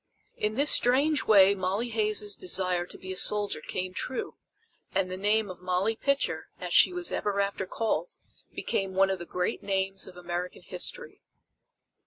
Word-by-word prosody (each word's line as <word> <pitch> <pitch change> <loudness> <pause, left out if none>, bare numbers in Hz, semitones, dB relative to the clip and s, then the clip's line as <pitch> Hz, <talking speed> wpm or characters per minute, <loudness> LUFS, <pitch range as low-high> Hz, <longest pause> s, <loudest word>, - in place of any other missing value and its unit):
In 210 +1 -2
this 285 +4 +4
strange 275 +4 +4
way 200 -2 +6
Molly 200 +5 -2
Hays' 215 -2 +1
desire 180 -1 0
to - - -6
be 185 0 -7
a - - -7
soldier 205 -6 +2
came 185 +3 -4
true, 255 +7 -4 0.6
and 185 -1 0
the - - -3
name 210 +3 +1
of 185 -2 -9
Molly 185 +4 0
Pitcher, 280 +4 -1
as - - -4
she - - +6
was 360 -1 0
ever 200 -1 -1
after 200 -1 -1
called, 230 - -2 0.4
became 190 -1 -2
one 195 0 +4
of 190 - -3
the 175 - -7
great 180 0 -2
names 195 -1 -1
of 180 -1 -12
American 175 0 -5
History. 485 0 -4
195 Hz, 170 wpm, -28 LUFS, 185-220 Hz, 0.6 s, way